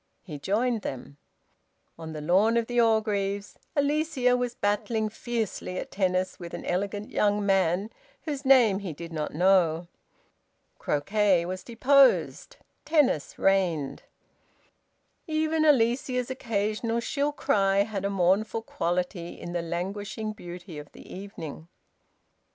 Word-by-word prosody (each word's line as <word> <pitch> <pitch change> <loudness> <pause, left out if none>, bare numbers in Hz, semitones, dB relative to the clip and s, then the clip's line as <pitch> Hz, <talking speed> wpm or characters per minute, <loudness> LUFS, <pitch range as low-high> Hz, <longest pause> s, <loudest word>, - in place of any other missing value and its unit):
He 150 -6 -8
joined 220 - 0
them. 135 -1 -7 0.8
On 160 -1 -7
the 155 -1 -6
lawn 195 +9 +3
of 230 - +1
the 245 +1 +2
Orgreaves, 205 -3 0 0.2
Alicia 285 -3 +2
was 245 -1 -2
battling 215 +2 0
fiercely 220 -5 -4
at - - -5
tennis 185 -1 0
with 170 -1 -7
an - - -8
elegant 200 +3 -2
young 205 0 +1
man 195 +1 +2 0.3
whose 290 -3 -4
name 245 -8 +5
he 190 -5 -5
did 165 +2 -9
not 150 -1 -3
know. 175 -2 +3 0.9
Croquet 190 +3 +2
was 185 +1 -5
deposed; 265 +3 +3 0.3
tennis 295 - +1
reigned. 175 -8 +1 1.3
Even 315 0 +1
Alicia's 250 -2 +2
occasional 225 -2 -1
shrill 285 +4 -1
cry 200 -7 +2
had 205 -2 -4
a 200 - 0
mournful 200 +4 +1
quality 175 -2 -3
in 175 - -7
the 175 - -1
languishing 195 +5 -4
beauty 175 -4 -9
of 145 -1 -11
the - - -12
evening. 165 -5 -8
200 Hz, 125 wpm, -27 LUFS, 180-235 Hz, 1.3 s, name